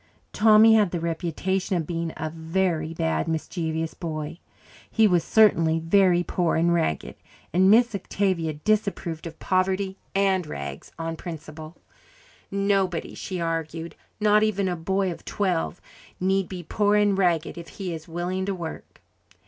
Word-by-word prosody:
Tommy 220 Hz, +1 st, +7 dB
had 210 Hz, -4 st, +4 dB
the 175 Hz, -, -3 dB
reputation 175 Hz, +3 st, -1 dB
of 165 Hz, -, -2 dB
being 165 Hz, 0 st, -3 dB
a 155 Hz, 0 st, -3 dB
very 165 Hz, 0 st, -1 dB
bad, 80 Hz, -, -1 dB
mischievous 160 Hz, 0 st, -2 dB
boy; 155 Hz, -1 st, -5 dB, 0.5 s
he 225 Hz, -, +3 dB
was 180 Hz, -5 st, +3 dB
certainly 165 Hz, -7 st, +4 dB
very 175 Hz, +1 st, +3 dB
poor 175 Hz, -1 st, 0 dB
and 170 Hz, +1 st, +3 dB
ragged, 160 Hz, -, -1 dB, 0.4 s
and 185 Hz, +2 st, +5 dB
Miss 235 Hz, +2 st, +5 dB
Octavia 185 Hz, -4 st, -1 dB
disapproved 175 Hz, -2 st, -1 dB
of 160 Hz, -1 st, -10 dB
poverty 190 Hz, +2 st, 0 dB, 0.2 s
and 190 Hz, -3 st, +2 dB
rags 70 Hz, -, -7 dB
on 165 Hz, 0 st, -3 dB
principle. 160 Hz, -1 st, -8 dB, 0.7 s
Nobody, 195 Hz, -3 st, 0 dB
she 185 Hz, -2 st, -5 dB
argued, 165 Hz, 0 st, -3 dB, 0.3 s
not 210 Hz, 0 st, +4 dB
even 200 Hz, -3 st, +1 dB
a 180 Hz, -, -1 dB
boy 190 Hz, +3 st, 0 dB
of 170 Hz, -, -9 dB
twelve, 180 Hz, -3 st, -1 dB, 0.4 s
need 190 Hz, 0 st, +1 dB
be 180 Hz, -2 st, -6 dB
poor 205 Hz, +5 st, +1 dB
and 205 Hz, -1 st, +3 dB
ragged 175 Hz, -4 st, +1 dB
if 170 Hz, -1 st, -9 dB
he 185 Hz, -4 st, -5 dB
is 160 Hz, 0 st, -8 dB
willing 180 Hz, +3 st, -3 dB
to 200 Hz, -, -1 dB
work. 170 Hz, -3 st, -8 dB
175 Hz, 150 wpm, -25 LUFS, 165-195 Hz, 0.7 s, Tommy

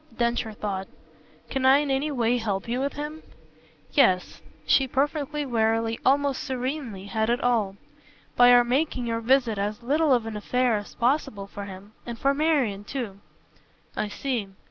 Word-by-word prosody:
Densher 235 Hz, -1 st, 0 dB
thought. 195 Hz, -2 st, -4 dB, 0.6 s
"Can 265 Hz, -1 st, -1 dB
I 265 Hz, +1 st, +7 dB
in 290 Hz, -1 st, 0 dB
any 270 Hz, +3 st, 0 dB
way 245 Hz, -3 st, +1 dB
help 200 Hz, -3 st, -2 dB
you 240 Hz, +2 st, -1 dB
with 280 Hz, +1 st, -1 dB
him?" 300 Hz, +2 st, -6 dB, 0.7 s
"Yes." 185 Hz, -11 st, +3 dB, 0.2 s
She 270 Hz, -1 st, +4 dB
perfectly, 290 Hz, +2 st, -1 dB
wearily, 225 Hz, -2 st, 0 dB
almost 280 Hz, 0 st, +2 dB
serenely, 255 Hz, -6 st, -4 dB
had 220 Hz, +2 st, -1 dB
it 240 Hz, +1 st, +2 dB
all. 220 Hz, -6 st, +1 dB, 0.6 s
"By 245 Hz, 0 st, +7 dB
our 245 Hz, 0 st, +7 dB
making 255 Hz, +1 st, 0 dB
your 230 Hz, -1 st, -2 dB
visit 240 Hz, -3 st, +2 dB
as 210 Hz, +4 st, -3 dB
little 295 Hz, +4 st, +2 dB
of 240 Hz, -3 st, +3 dB
an 225 Hz, -1 st, -5 dB
affair 250 Hz, +3 st, +1 dB
as 205 Hz, -, -8 dB
possible 240 Hz, -5 st, 0 dB
for 200 Hz, 0 st, -8 dB
him 195 Hz, +1 st, -10 dB
and 235 Hz, -1 st, -6 dB
for 275 Hz, +4 st, +2 dB
Marian 280 Hz, -10 st, +1 dB
too." 210 Hz, -4 st, -5 dB, 0.8 s
"I 215 Hz, -, -1 dB
see. 235 Hz, -1 st, -3 dB
245 Hz, 165 wpm, -26 LUFS, 215-275 Hz, 0.8 s, I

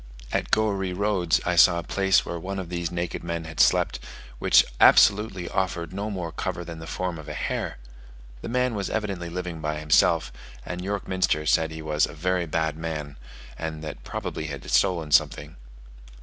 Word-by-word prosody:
At -, -, -1 dB
Goeree 100 Hz, -4 st, +1 dB
Roads 95 Hz, -3 st, +1 dB
I 90 Hz, -, +1 dB
saw 85 Hz, +1 st, +6 dB
a 85 Hz, -, -3 dB
place 95 Hz, -1 st, +2 dB
where 85 Hz, -, -4 dB
one 95 Hz, +3 st, -5 dB
of 95 Hz, -3 st, -5 dB
these 85 Hz, -2 st, -2 dB
naked 85 Hz, -1 st, -4 dB
men 85 Hz, -1 st, -3 dB
had 80 Hz, -1 st, -9 dB
slept, -, -, +3 dB, 0.4 s
which -, -, +5 dB
absolutely 100 Hz, -3 st, +5 dB
offered 90 Hz, -3 st, -2 dB
no 100 Hz, +3 st, -3 dB
more 90 Hz, -5 st, -4 dB
cover 85 Hz, -, -4 dB
than 85 Hz, -1 st, -8 dB
the 80 Hz, -, -9 dB
form 90 Hz, -2 st, -3 dB
of 80 Hz, -, -10 dB
a -, -, -5 dB
hare. -, -, -3 dB, 0.6 s
The -, -, -6 dB
man 125 Hz, 0 st, +1 dB
was 100 Hz, -2 st, -3 dB
evidently 100 Hz, -6 st, -3 dB
living 85 Hz, -2 st, -5 dB
by 75 Hz, 0 st, -2 dB
himself, 75 Hz, -1 st, +3 dB, 0.3 s
and 90 Hz, 0 st, -5 dB
York 100 Hz, +1 st, -3 dB
Minster 95 Hz, -5 st, +1 dB
said 80 Hz, +1 st, +3 dB
he 80 Hz, 0 st, -8 dB
was 75 Hz, -1 st, +2 dB
"very 90 Hz, +2 st, -1 dB
bad 80 Hz, -1 st, -1 dB
man," 75 Hz, -3 st, -5 dB, 0.4 s
and 80 Hz, -1 st, -5 dB
that 75 Hz, -, -7 dB
probably 80 Hz, -, -5 dB
he -, -, -5 dB
had 70 Hz, -2 st, -7 dB
stolen 85 Hz, -6 st, +2 dB
something. 75 Hz, +1 st, +2 dB
85 Hz, 185 wpm, -25 LUFS, 80-95 Hz, 0.6 s, saw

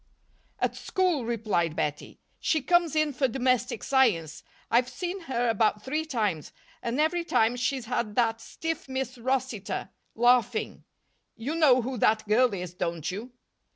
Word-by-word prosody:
"At -, -, -1 dB
school," 360 Hz, -, 0 dB
replied 210 Hz, -9 st, 0 dB
Bettie. 150 Hz, -2 st, -3 dB, 0.2 s
"She 315 Hz, -4 st, +1 dB
comes 345 Hz, -1 st, +3 dB
in 310 Hz, -2 st, +2 dB
for 265 Hz, +1 st, +1 dB
Domestic 250 Hz, 0 st, 0 dB
Science. 200 Hz, -, +2 dB, 0.3 s
I've 245 Hz, +2 st, +3 dB
seen 360 Hz, +5 st, -4 dB
her 245 Hz, -1 st, +1 dB
about 215 Hz, -2 st, +1 dB
three 305 Hz, +4 st, -2 dB
times, 210 Hz, -, -2 dB, 0.3 s
and 235 Hz, +4 st, -2 dB
every 330 Hz, +3 st, +2 dB
time 230 Hz, -7 st, +2 dB
she's 255 Hz, 0 st, -1 dB
had 220 Hz, -3 st, -2 dB
that 230 Hz, -1 st, +1 dB
stiff 325 Hz, 0 st, -5 dB
Miss 260 Hz, -2 st, -3 dB
Rossitor 255 Hz, -4 st, -2 dB, 0.3 s
laughing. 240 Hz, -1 st, +2 dB, 0.5 s
You 235 Hz, +7 st, -4 dB
know 280 Hz, -7 st, +5 dB
who 255 Hz, +1 st, -3 dB
that 215 Hz, 0 st, +2 dB
girl 240 Hz, +3 st, +4 dB
is, 180 Hz, -3 st, -5 dB
don't 170 Hz, -3 st, -3 dB
you?" 220 Hz, +7 st, -7 dB
245 Hz, 150 wpm, -27 LUFS, 220-270 Hz, 0.5 s, know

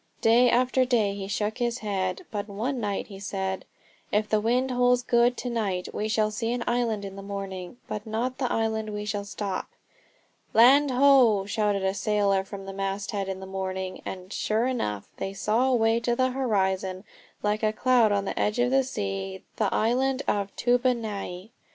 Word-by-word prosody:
Day 240 Hz, +2 st, +5 dB
after 255 Hz, +2 st, +3 dB
day 230 Hz, -6 st, +2 dB
he 195 Hz, -1 st, -5 dB
shook 210 Hz, +3 st, -2 dB
his 240 Hz, 0 st, 0 dB
head. 185 Hz, -3 st, -2 dB
But 205 Hz, -1 st, -3 dB
one 240 Hz, +7 st, -2 dB
night 205 Hz, -3 st, -2 dB
he 195 Hz, -2 st, -11 dB
said: 190 Hz, -1 st, -3 dB, 0.5 s
"If 210 Hz, +1 st, +1 dB
the 215 Hz, 0 st, +2 dB
wind 250 Hz, +4 st, +1 dB
holds 245 Hz, 0 st, +3 dB
good 240 Hz, 0 st, +3 dB
to 250 Hz, -, -3 dB
night 195 Hz, -6 st, -2 dB
we 210 Hz, -, -2 dB
shall 215 Hz, 0 st, +1 dB
see 225 Hz, +2 st, -2 dB
an 245 Hz, -1 st, -2 dB
island 230 Hz, -4 st, 0 dB
in 195 Hz, 0 st, -7 dB
the 195 Hz, -, -7 dB
morning, 195 Hz, 0 st, -6 dB
but 210 Hz, +1 st, -5 dB
not 240 Hz, +4 st, -2 dB
the 255 Hz, -3 st, 0 dB
island 220 Hz, -1 st, 0 dB
where 210 Hz, -, -5 dB
we 210 Hz, -, -4 dB
shall 205 Hz, -1 st, -3 dB
stop." 200 Hz, -2 st, -4 dB, 0.9 s
"Land 275 Hz, +5 st, +7 dB
ho!" 250 Hz, -6 st, +5 dB
shouted 205 Hz, -1 st, 0 dB
a 190 Hz, 0 st, +1 dB
sailor 200 Hz, -2 st, +1 dB
from 195 Hz, 0 st, -8 dB
the 195 Hz, -, -6 dB
masthead 195 Hz, 0 st, -3 dB
in 190 Hz, 0 st, -4 dB
the -, -, -6 dB
morning, 190 Hz, -1 st, -4 dB
and, 185 Hz, +1 st, -7 dB
sure 220 Hz, +2 st, 0 dB
enough, 105 Hz, -, -2 dB
they 195 Hz, -, -4 dB
saw 225 Hz, +6 st, +1 dB
away 230 Hz, -2 st, +3 dB
on 240 Hz, -, +3 dB
the 255 Hz, +1 st, +2 dB
horizon, 190 Hz, -7 st, 0 dB, 0.4 s
like 210 Hz, +1 st, 0 dB
a 215 Hz, -1 st, +2 dB
cloud 240 Hz, -1 st, +3 dB
on 200 Hz, -1 st, +1 dB
the -, -, -3 dB
edge 210 Hz, +2 st, +1 dB
of 245 Hz, +1 st, +2 dB
the 270 Hz, 0 st, +4 dB
sea, 95 Hz, -, -4 dB
the -, -, +1 dB
island 260 Hz, +4 st, +1 dB
of 200 Hz, -1 st, 0 dB
Toobonai. 225 Hz, -6 st, -1 dB
215 Hz, 190 wpm, -26 LUFS, 195-245 Hz, 0.9 s, Land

